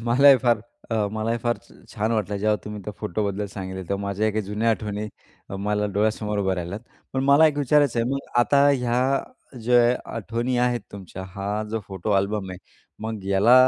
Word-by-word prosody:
मलाही 135 +3 +7
फार 120 -4 +3 0.3
अ, 115 - 0 0.2
मलाही 110 +2 -1
फार 120 +1 0
छा - - -21 0.2
छान 110 +2 0
वाटलं. 105 -2 -1
जेव्हा 105 +1 +2
तुम्ही 105 0 -6
त्या 105 - -5
फोटोबद्दल 105 0 -2
सांगितले 95 -1 -5
तेव्हा. 100 0 -1
माझ्या 100 +2 0
काही 110 - -1
जुन्या 105 +3 0
आठवणी 105 -1 -2 0.6
मला 105 0 +1
डोळ्यासमोर 105 0 0
उभ्या 95 -1 +1
राहिल्यात. 90 +3 -4 0.3
पण 135 0 0
मला 140 +3 +7
एक 145 -1 0
विचारायचं 145 -3 +3
आहे, 115 - 0
मग 135 - 0 0.2
आता 140 +3 +4
ह्या 125 -3 +2 0.2
अ, 135 - -10
ज्या 120 +1 +4 0.2
आठवणी 115 +3 -2
आहेत, 125 -1 +2
तुमच्या 95 -1 -8
हा 100 +2 -2
जो 115 - -1
फोटो 95 +2 -4
अल्बम 100 -1 -3
आहे. 90 - -7 0.4
मग 110 -3 -4
याला 100 +5 +5
110 Hz, 185 wpm, -24 LUFS, 100-120 Hz, 0.6 s, मलाही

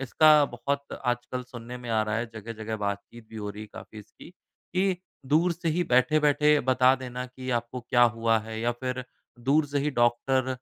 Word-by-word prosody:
इसका 150 +3 +5
बहुत 140 +2 -4
आजकल 125 +1 -2
सुनने 125 -1 -9
में 120 - -9
आ 110 -1 +2
रहा 105 0 -1
है। 120 +1 -1
जगह-जगह 110 0 -5
बातचीत 100 +2 -5
भी 110 - -10
हो 105 -1 -4
रही 105 +1 -8
है 110 - -10
काफ़ी 110 - -10
इसकी 105 - -14
कि, 185 +1 -3 0.3
दूर 160 +6 +3
से 170 0 -3
ही 165 +3 +1
बैठे-बैठे 150 +3 +4
बता 130 +1 +4
देना 125 -1 -6
कि 130 +1 -7
आपको 120 +1 -2
क्या 120 0 +2
हुआ 115 -1 +3
है 110 +1 -6
या 120 +1 +1
फिर 125 +1 -4 0.3
दूर 140 +5 +2
से 145 0 -1
ही 150 +2 0
डॉक्टर 130 +1 +1
125 Hz, 190 wpm, -27 LUFS, 115-140 Hz, 0.3 s, इसका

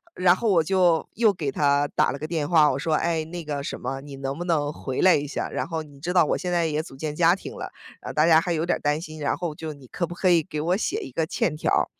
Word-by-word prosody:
然 180 -1 +4
后 225 +3 -1
我 170 - +5
就 175 -2 +2
又 220 -1 +4
给 150 -7 -3
他 145 0 +2
打 - - +3
了 140 - -6
个 155 - -4
电 155 -3 -2
话， 155 -4 +5
我 130 - -2
说： 160 +2 -1
“诶， 165 -1 0
那 170 +1 -7
个 145 -2 -4
什 - - -5
么， 135 +2 -4
你 140 -1 -10
能 135 +1 -4
不 175 - -4
能 150 -4 +1
回 130 -3 -5
来 185 - +6
一 145 - -1
下？ 140 - -3
然 - - -3
后 165 -2 -3
你 145 -2 -16
知 175 - -2
道 175 -3 +5
我 - - 0
现 180 - -3
在 170 -2 +2
也 155 0 -1
组 135 - -12
建 150 +1 -4
家 170 +1 +5
庭 195 - -9
了， - - -6 0.3
然 - - -7
后 - - -5
大 155 - +3
家 160 -1 +6
还 175 - -3
有 160 +1 -1
点 175 - +1
儿 - - -17
担 150 +1 0
心， 155 -2 -9
然 145 - 0
后 165 -3 -4
就 160 0 -6
你 135 -3 -15
可 175 - -2
不 175 - -8
可 185 - +1
以 170 -2 +4
给 155 -3 -5
我 175 +4 +1
写 405 - -1
一 - - -8
个 165 - 0
欠 160 -1 -1
条 155 - -1
儿？” - - +3
160 Hz, 335 characters per minute, -25 LUFS, 145-175 Hz, 0.3 s, 来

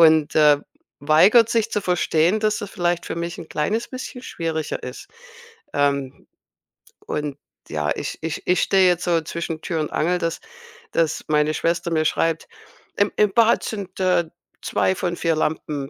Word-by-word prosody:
und, 155 -2 +5
äh, 150 -2 +6 0.4
weigert 190 +11 +5
sich 230 -2 +1
zu 210 - 0
verstehen, 180 +1 +2
dass 215 0 +1
es 205 - -6
vielleicht 175 -3 -1
für - - -3
mich 170 0 -4
'n 160 - -9
kleines 210 +10 -1
bisschen 255 -1 -7
schwieriger 160 - -3
ist. 125 +1 -8 0.7
Ähm, 140 -2 -1 0.8
und 150 -2 -3 0.3
ja, 75 -2 -1
ich - - -5
ich 160 0 -4
ich 180 - +3
stehe 190 -1 +4
jetzt 180 -1 +2
so 170 -2 +2
zwischen 165 0 -5
Tür 165 -3 -2
und 150 - -4
Angel, 175 +3 +1
dass 165 -1 -2 0.5
dass 165 -2 0
meine 150 0 +2
Schwester 170 +2 -1
mir 160 -1 +2
schreibt: 165 +1 0 0.5
„Im 205 0 +2
im 210 -2 +4
Bad 230 +1 +4
sind, 200 -4 -6
äh, 180 -2 +3 0.4
2 185 - +1
von 175 -2 -2
4 165 -1 +1
Lampen 150 -3 -2
165 Hz, 165 wpm, -22 LUFS, 155-185 Hz, 0.8 s, äh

